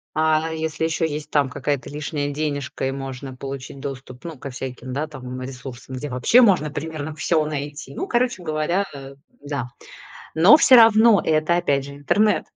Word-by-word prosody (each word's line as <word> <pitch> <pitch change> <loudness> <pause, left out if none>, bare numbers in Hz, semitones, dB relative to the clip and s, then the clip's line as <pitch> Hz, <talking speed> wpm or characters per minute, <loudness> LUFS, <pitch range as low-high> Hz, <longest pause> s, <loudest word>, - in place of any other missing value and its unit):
А 155 +1 +2
если 160 0 -2
еще 160 0 0
есть 150 0 -6
там 140 -3 +2
какая-то 140 +1 -3
лишняя 145 0 -3
денежка 145 -3 -3
и - - -1
можно 135 -1 -7
получить 135 0 -7
доступ, 135 -1 -8
ну, 165 -4 -7
ко 140 - -7
всяким, 130 0 -7
да, 150 +3 -2
там, 130 -3 -8
ресурсам, 130 0 -8
где 145 +3 -5
вообще 125 - +4
можно 185 -10 +4
примерно 155 0 -5
всё 160 -1 +1
найти. 145 -2 -5
Ну, - - -4
короче 240 -5 0
говоря, 155 +5 0
э, 135 0 -10 0.3
да. 140 -4 -4 0.6
Но 180 - +7
всё 265 - +7
равно 225 -3 +7
это, 155 +2 +2
опять 140 -5 0
же, 140 0 -9
интернет. 210 +9 +1
145 Hz, 170 wpm, -22 LUFS, 135-160 Hz, 0.6 s, Но